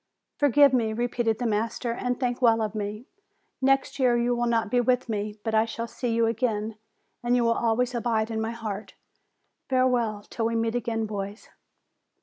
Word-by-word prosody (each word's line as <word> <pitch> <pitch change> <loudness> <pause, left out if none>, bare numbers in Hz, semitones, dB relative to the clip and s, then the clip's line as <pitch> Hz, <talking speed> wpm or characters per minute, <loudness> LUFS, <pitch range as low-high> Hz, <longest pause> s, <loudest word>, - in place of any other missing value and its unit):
"Forgive 285 -1 +5
me," 225 -3 +1
repeated 235 -1 0
the 245 - -3
master, 225 +2 -1
"and 245 +1 -2
think 245 -1 -1
well 230 -2 +4
of 215 - -3
me. 210 +2 -4 0.6
Next 270 +1 +2
year 245 -2 +4
you 240 +1 +1
will 240 0 0
not 225 -2 +1
be 245 - +3
with 250 +1 +1
me; 210 -1 -3
but 225 - -2
I 220 0 +4
shall 230 +1 -4
see 235 +1 -3
you 230 0 +2
again, 225 -2 -1 0.5
and 240 0 +2
you 245 - +3
will 230 0 +3
always 235 +2 +1
abide 230 -2 0
in 220 0 -2
my 220 - -1
heart. 220 -3 -6 0.7
Farewell 250 -4 +2
until 225 +1 -2
we 230 - -2
meet 225 0 0
again, 230 -2 -1
boys 205 0 -6
230 Hz, 185 wpm, -26 LUFS, 220-245 Hz, 0.7 s, Forgive